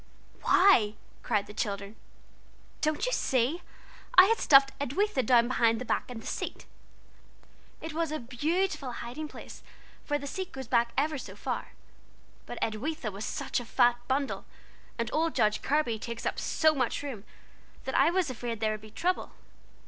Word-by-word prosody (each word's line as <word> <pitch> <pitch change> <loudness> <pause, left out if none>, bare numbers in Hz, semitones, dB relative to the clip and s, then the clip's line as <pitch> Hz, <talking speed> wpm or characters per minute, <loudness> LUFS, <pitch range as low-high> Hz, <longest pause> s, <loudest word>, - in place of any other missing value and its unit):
'" - - -28
"Why?" 235 - +5 0.3
cried 205 -1 0
the 210 - -11
children. 200 0 -3 0.9
"Don't 310 +5 +1
you - - -1
see? 265 - +1 0.5
I 370 - +10
had 455 +3 +2
stuffed 275 -1 +6
'Edwitha' 285 - 0
down 235 0 +5
between 230 -2 +3
the 255 - -5
back - - -1
and 230 -3 -7
the - - -13
seat. - - -4 1.2
It 320 -1 -6
was 325 -1 -1
a 310 - -1
_beau_tiful 300 +2 -1
hiding 265 +6 -6
place, - - -11 0.4
for 290 - 0
the 285 - -8
seat 370 +6 -5
goes 265 -1 -6
back 235 0 +2
ever 295 +1 +1
so - - -9
far; - - -4 0.7
but - - -6
Edwitha 235 +2 -2
was 200 +2 -6
such - - -2
a - - -6
fat 240 0 +3
bundle, 275 +1 -1 0.5
and 230 -1 -2
old 325 +1 +1
Judge 210 0 +2
Kirby 270 -6 +1
takes 235 0 -6
up - - -1
so 315 0 +3
much 260 -1 -1
room, 255 -9 -6 0.6
that 265 - -4
I 275 +4 +5
was 350 -5 +1
afraid 235 -2 -4
there 215 0 +1
would 215 -1 -4
be 215 - -12
trouble. 355 +12 -1
265 Hz, 170 wpm, -29 LUFS, 230-310 Hz, 1.2 s, I